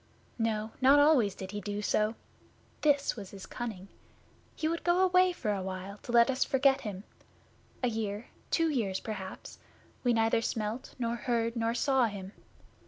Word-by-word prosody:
No 220 -1 -1
not 270 +2 +7
always 285 -10 +4
did 190 0 -7
he 205 0 -4
do 205 0 -4
so! 215 +2 +1 0.7
This 285 -2 +2
was 200 -5 -8
his 195 -2 -10
cunning! 215 -6 -6 0.7
He 310 - -1
would 335 +1 -2
go 350 +1 +3
away 365 0 +5
for 220 -12 -2
a 195 - -2
while 190 +2 -6
to - - -7
let 235 +1 +6
us 260 - +1
forget 270 0 +3
him. 200 -3 -6 0.8
A - - +4
year 220 -2 -3 0.2
two 330 -1 +2
years 200 -9 -1
perhaps 195 -4 -7 0.4
we 245 - +3
neither 225 0 +3
smelt, 220 +1 -3
nor 235 -1 -1
heard, 230 -1 -1
nor 230 0 0
saw 265 0 +3
him. 195 -2 -7
230 Hz, 170 wpm, -30 LUFS, 205-265 Hz, 0.8 s, not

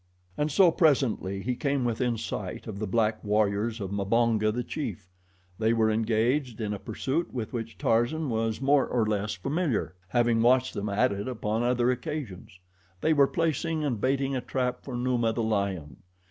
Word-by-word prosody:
And 150 +1 -1
so 180 +3 +6
presently 125 - +1
he 125 - 0
came 140 0 0
within 120 0 0
sight 105 -4 -5
of 105 -3 -6
the 110 - -2
black 110 +1 +1
warriors 105 +2 +1
of 100 -2 -4
Mbonga, 110 +2 +2
the 125 +3 -2
chief. 105 - -5 0.5
They 110 +1 +3
were 110 -1 +3
engaged 115 +4 0
in 105 -2 -2
a 100 - -5
pursuit 130 - -2
with 120 -2 -5
which 115 -4 -5
Tarzan 120 - +1
was 110 -1 -1
more 140 0 +3
or 120 -3 +1
less 105 0 -1
familiar, 140 - -1
having 120 +2 +2
watched 130 +2 +3
them 105 +1 -3
at 105 +6 +2
it 100 +3 -4
upon 110 -3 -2
other 125 0 +2
occasions. 125 - -6 0.4
They 160 - +3
were 140 -2 +5
placing 160 -1 -1
and 125 -8 -1
baiting 135 +2 +1
a 130 - -1
trap 125 0 -2
for 130 - -6
Numa, 120 -2 +1
the 115 - -1
lion. 100 -8 -2
115 Hz, 175 wpm, -27 LUFS, 105-130 Hz, 0.5 s, so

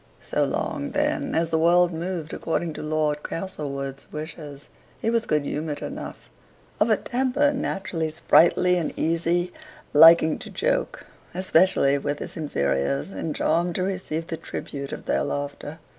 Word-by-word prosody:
So - - -1
long, 285 -1 -2
then, 295 -1 0
as 165 0 +1
the 160 - +2
world 175 +1 +4
moved 165 -1 -4
according 165 0 -2
to - - -7
Lord 155 -1 0
Castlewood's 140 -7 -5
wishes, 150 -2 -8 0.3
he 225 - 0
was 230 0 +1
good 150 -1 +1
humored 150 0 -3
enough; - - -7 0.5
of 215 - +3
a 215 - +4
temper 265 +3 +1
naturally 190 - -2
sprightly 170 +2 +4
and 170 - -3
easy, 170 +2 0 0.4
liking 160 +1 +7
to - - -8
joke, - - -1 0.3
especially 175 -6 +3
with 145 +1 -2
his - - -7
inferiors, 70 - -1
and 150 +11 -4
charmed 170 +2 +1
to 185 - 0
receive 185 -4 -3
the 165 - -5
tribute 140 -3 -6
of - - -7
their - - +1
laughter. 145 +2 -4
165 Hz, 150 wpm, -24 LUFS, 150-185 Hz, 0.5 s, liking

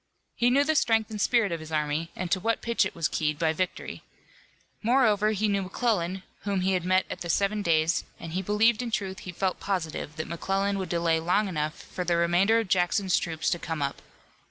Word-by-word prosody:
He 240 - +3
knew 275 +3 +4
the 315 +2 +1
strength 225 -6 +2
and 210 -1 -4
spirit 230 -5 +3
of 165 - -2
his 155 0 -10
army 155 +1 -1
and 180 -1 -4
to 190 - +3
what 225 +4 +1
a - - -29
pitch 235 0 +1
it - - -12
was 165 -3 +1
keyed 150 -2 -1
by 160 0 +1
victory. 185 +2 -4 0.8
Moreover, 220 -3 +3
he 215 0 0
knew 200 -1 +1
McClellan, 190 -2 -1 0.2
whom 200 -2 -1
he 190 +1 +1
had 180 -2 0
met 185 +1 +2
at - - -7
the 170 - -5
Seven 200 +4 +1
Days, 165 -2 +2 0.2
and 165 - -7
he 185 - 0
believed, 210 +4 +3
in 245 - -3
truth 195 -3 -3
he 185 - -7
felt 185 +1 -1
positive 165 -6 -3
that 160 - -4
McClellan 195 +4 -1
would 185 -2 -4
delay 170 -1 +1
long 180 +6 +1
enough 155 -3 -3
for 180 - -5
the 175 -1 +1
remainder 175 +6 +3
of 225 -3 0
Jackson's 185 +1 +2
troops 160 -2 -3
to 175 - 0
come 160 -4 -3
up. 140 - -3
185 Hz, 225 wpm, -27 LUFS, 165-210 Hz, 0.8 s, knew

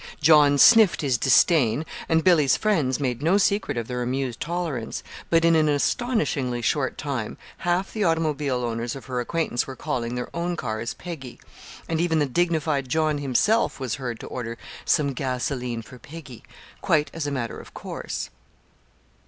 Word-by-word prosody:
John 150 -2 +6
sniffed 220 +3 +6
his 130 -5 +1
disdain, 135 -1 +4 0.2
and 160 -1 +3
Billy's 155 -7 +4
friends 155 - +1
made 125 -3 -2
no 170 +6 +3
secret 200 -8 +1
of 115 -1 -3
their 125 -1 -3
amused 125 -1 -2
tolerance; 165 -9 -3 0.3
but, 165 0 +3
in 165 0 +5
an 155 -1 +3
astonishingly 145 - 0
short 135 +2 0
time, 130 -7 -4 0.2
half 175 +2 -1
the 215 - -1
automobile 150 -6 0
owners 115 +1 -3
of 135 - -9
her 125 -2 -3
acquaintance 125 -1 -1
were 135 - -7
calling 120 -1 -3
their 125 +4 -5
own 175 +1 -1
cars 115 -5 -4
"Peggy"; 145 -8 -8 0.5
and 165 0 0
even 165 -2 +1
the 150 - +2
dignified 155 -2 0
John 155 0 +1
himself 145 - +1
was 130 -4 -3
heard 120 -3 -4
to - - -8
order 115 -2 -5 0.3
"some 140 -3 +2
gasoline 125 -2 -3
for 125 +3 -13
Peggy," 145 -2 -11 0.4
quite 155 -6 +1
as 160 -3 -3
a - - -2
matter 125 -4 -3
of - - -14
course. - - -5
145 Hz, 165 wpm, -24 LUFS, 125-165 Hz, 0.5 s, John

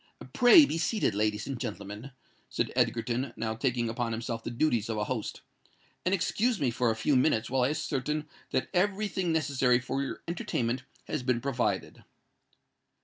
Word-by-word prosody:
"Pray 250 +6 +8
be 165 - -2
seated, 215 +5 +1
ladies 105 +1 0
and 135 -3 -4
gentlemen," 105 +1 -6 0.4
said - - -2
Egerton, 120 +2 0
now 110 -1 -2
taking 120 +1 0
upon 115 0 -2
himself 115 0 -4
the - - -3
duties 120 -3 +1
of 110 - -1
a 105 - 0
host: 115 -1 -4 0.6
"and 180 - +1
excuse 210 +4 +1
me 130 -4 +1
for 120 +1 +1
a 110 - +1
few 135 +6 +1
minutes 125 -3 +2
while 135 -1 +2
I 125 - +3
ascertain 150 0 -2 0.2
that - - 0
every 200 +3 +1
thing 185 -3 -1
necessary 135 -6 +2
for 135 +2 -2
your 140 - -5
entertainment 130 -7 -1 0.2
has - - -3
been 125 -1 +1
provided." 130 -1 -2
125 Hz, 170 wpm, -29 LUFS, 115-155 Hz, 0.6 s, Pray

